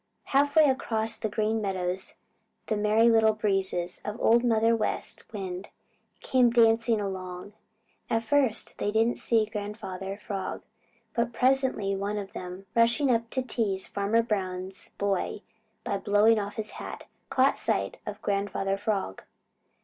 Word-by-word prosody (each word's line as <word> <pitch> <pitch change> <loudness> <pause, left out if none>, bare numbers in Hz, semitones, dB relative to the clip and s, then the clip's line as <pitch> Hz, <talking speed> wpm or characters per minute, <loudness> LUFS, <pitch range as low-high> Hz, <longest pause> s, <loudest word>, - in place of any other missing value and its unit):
Half 285 +2 +2
way 315 - +8
across 225 -4 -1
the 220 - -2
Green 215 +1 0
Meadows 185 -2 -3 0.5
the 215 - -1
Merry 210 +2 +3
Little 225 -1 +5
Breezes 190 -4 -1
of 210 +3 -5
Old 235 +1 +4
Mother 230 -1 +3
West 215 -2 -2
Wind 190 -2 -5 0.5
came 255 -2 +3
dancing 230 -1 +4
along. 190 -1 -5 0.6
At 225 0 +1
first 255 -2 +1
they - - 0
didn't 225 +3 +1
see 225 -2 +2
Grandfather 205 -2 -6
Frog, 195 -2 -5 0.5
but 235 0 0
presently 255 -5 +2
one 200 +2 -2
of 195 -2 -6
them, 180 +2 -7
rushing 235 +4 +4
up 230 -1 0
to 260 +1 -1
tease 205 -6 -1
Farmer 205 +3 +1
Brown's 190 -3 -3
boy 200 +1 -1 0.4
by 200 - -2
blowing 210 +3 +4
off 205 0 -5
his 215 -1 -3
hat, - - -8 0.3
caught 265 +1 +3
sight - - 0
of - - -7
Grandfather 195 -1 -1
Frog. 200 - -2
210 Hz, 140 wpm, -28 LUFS, 195-230 Hz, 0.6 s, way